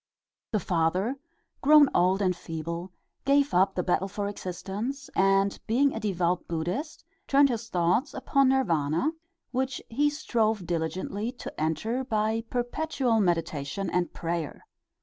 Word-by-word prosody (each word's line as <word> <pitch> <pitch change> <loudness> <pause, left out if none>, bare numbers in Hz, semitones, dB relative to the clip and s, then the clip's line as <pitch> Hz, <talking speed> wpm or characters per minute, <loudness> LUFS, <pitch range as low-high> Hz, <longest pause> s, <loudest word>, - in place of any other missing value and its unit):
The 215 - +1
father, 180 +8 0 0.4
grown 295 0 +7
old 185 +3 +3
and 185 -1 +2
feeble, 170 +2 -5 0.3
gave 280 +1 +3
up 190 +2 +3
the 180 - 0
battle 185 +2 +1
for 200 +1 -3
existence, 205 +8 -5
and 195 +1 +3
being 270 +5 +3
a - - -3
devout 180 -4 0
Buddhist, 175 - -3 0.2
turned 280 0 +5
his 230 -2 -3
thoughts 180 - +1
upon 275 -2 +2
Nirvana, 170 - +1 0.4
which 260 0 -1
he 290 +6 +2
strove 225 - 0
diligently 185 +6 -2
to 245 - -8
enter 215 - -1
by 220 -2 0
perpetual 245 -1 0
meditation 165 -2 -1
and 180 -1 0
prayer. 165 -2 -4
200 Hz, 130 wpm, -27 LUFS, 175-255 Hz, 0.4 s, grown